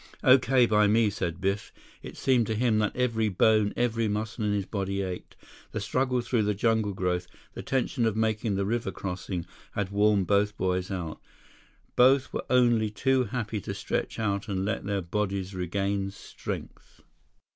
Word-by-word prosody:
"Okay 130 -1 +5
by 105 -2 +4
me," 110 0 +3
said 90 -3 -3
Biff. 95 +2 -1 0.3
It - - -9
seemed 125 -4 +2
to 110 - -1
him 110 -1 +2
that 105 -1 0
every 115 -3 +1
bone, 105 +2 +3
every 115 -2 +1
muscle 105 +2 -3
in 105 - +1
his 100 -2 0
body 100 -1 -2
ached. 90 -1 -6 0.4
The - - -2
struggle 125 +4 0
through 120 -1 0
the 105 0 0
jungle 110 -1 +1
growth, 90 -1 -1 0.3
the - - -6
tension 125 -2 0
of 110 - 0
making 110 -1 0
the 100 0 0
river 115 0 -1
crossing, 90 -1 -4 0.3
had 100 -2 -2
worn 105 -1 +3
both 105 +2 +1
boys 90 0 -1
out. 90 -5 -5 0.7
Both 130 +1 +4
were - - -3
only 120 -4 +4
too 130 +4 +1
happy 110 -2 -3
to - - -5
stretch - - -3
out 100 -2 -1
and 95 -2 -1
let 110 0 -2
their 100 -1 -1
bodies 100 +1 -2
regain 95 +2 -1
strength. 100 - -8
105 Hz, 170 wpm, -28 LUFS, 100-115 Hz, 0.7 s, Okay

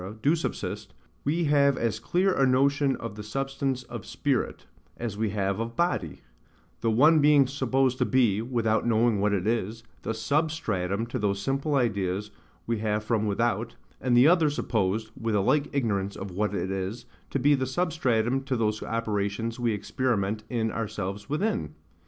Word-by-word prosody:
do 150 +4 +4
subsist, 165 - -4 0.3
we 160 +5 0
have 140 -3 +3
as 115 -2 -1
clear 185 - +1
a 135 - +2
notion 140 +1 +3
of 115 -2 -6
the 105 - -8
substance 135 +3 -2
of - - -8
spirit, - - -2 0.3
as 115 -4 -4
we 110 +1 -1
have 100 0 -1
of 115 +1 -4
body; 95 - -1 0.6
the 115 - 0
one 150 +8 +5
being 145 -1 +6
supposed 130 -1 0
to - - +4
be 115 -6 +2
(without 115 -2 0
knowing 115 -2 +3
what 105 +1 +2
it 100 -2 0
is) 115 0 -1 0.2
the 115 - -3
SUBSTRATUM 110 - -1
to 120 +2 -4
those 100 -2 0
simple 135 +7 -1
ideas 105 -5 0 0.3
we 115 -2 -1
have 105 0 -1
from 110 -1 0
without; 115 +2 0 0.3
and 125 -2 +3
the 125 +4 +7
other 165 -2 +5
supposed 110 -5 -1
(with 115 -1 -2
a - - +3
like 145 +9 +2
ignorance 100 -7 -1
of 95 -1 -6
what 105 +3 -1
it 95 - -2
is) 95 +4 -4 0.2
to - - -1
be 145 +3 +4
the 130 -2 0
SUBSTRATUM 130 -5 0
to 130 -2 -1
those 110 -1 0
operations 110 0 -2
we 120 -1 +1
experiment 105 -1 -1
in 110 -2 -1
ourselves 105 -1 -4
within. 190 +10 -1
115 Hz, 170 wpm, -27 LUFS, 105-135 Hz, 0.6 s, the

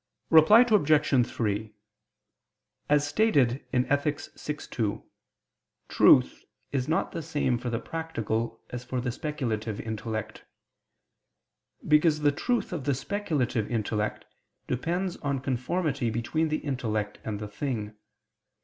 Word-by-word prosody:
Reply 165 +8 +8
Obj. 155 - +3
3: 105 -1 -2 1.2
As 145 0 +4
stated 145 - +2
in 125 0 +2
Ethic. 145 +1 0 0.2
vi, 150 - -4
2, 110 -6 -3 0.9
truth - - +5 0.3
is 135 -2 -1
not 160 - 0
the 165 - -4
same 145 -6 0
for 125 0 -4
the 115 - -1
practical 115 -8 -3
as 125 0 -5
for 125 0 -3
the 125 0 -2
speculative 115 -7 -3
intellect. 110 -1 -5 1.4
Because 150 0 +4
the 145 -1 +4
truth 240 - -1
of 150 -7 -4
the 140 -2 +2
speculative 135 - -1
intellect 110 -2 -2 0.4
depends 175 +8 -2
on 140 -1 -2
conformity 135 +1 -1
between 120 +8 -1
the 155 - 0
intellect 110 -7 -2
and 105 -2 -4
the 105 - -5
thing. 105 -1 -4
130 Hz, 120 wpm, -27 LUFS, 115-155 Hz, 1.4 s, Reply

